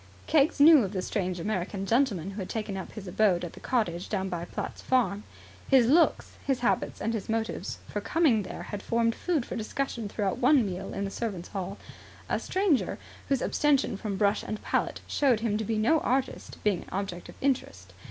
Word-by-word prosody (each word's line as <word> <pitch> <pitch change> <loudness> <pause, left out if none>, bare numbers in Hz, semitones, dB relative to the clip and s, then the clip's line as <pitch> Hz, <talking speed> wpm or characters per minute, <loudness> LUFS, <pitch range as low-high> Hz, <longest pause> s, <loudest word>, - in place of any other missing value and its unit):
Keggs 310 +1 +3
knew 300 -2 +8
of 195 0 -4
the 185 - -1
strange 185 -3 -2
American 195 +1 -2
gentleman 205 - +1
who 200 - -7
had 185 - -6
taken 215 -3 -3
up 190 - -6
his 205 -3 -8
abode 180 -2 +2
at 170 - -8
the - - -11
cottage 180 -8 -1
down 190 -2 -1
by 175 -1 -3
Platt's - - -6
farm. 240 -6 +1 0.5
His 265 -3 +6
looks, 320 +8 +3
his 270 -3 0
habits, 245 - 0
and 225 +2 -1
his 220 -2 -4
motives 225 0 -2
for 205 - -3
coming 275 -3 +3
there 185 - -7
had 205 - -6
formed 230 +1 +1
food 315 -5 -1
for - - -6
discussion 230 -1 -3
throughout 200 +2 -1
one 255 -1 +5
meal 185 -1 -4
in 200 - -2
the 195 - -4
servant's 195 -6 -4
hall; 195 0 -4 0.5
a - - +1
stranger 375 -8 +1 0.3
whose 270 -2 +1
abstention 280 -7 +2
from 200 0 -4
brush 205 0 +2
and 215 - -5
palette - - -1
showed 255 -6 +2
him 225 -3 0
to 220 - -1
be 220 +1 -1
no 240 +10 +3
artist 265 -1 -2
being 205 -4 +2
an - - -13
object 185 -2 -4
of - - -11
interest. 95 - -2
215 Hz, 200 wpm, -28 LUFS, 195-255 Hz, 0.5 s, knew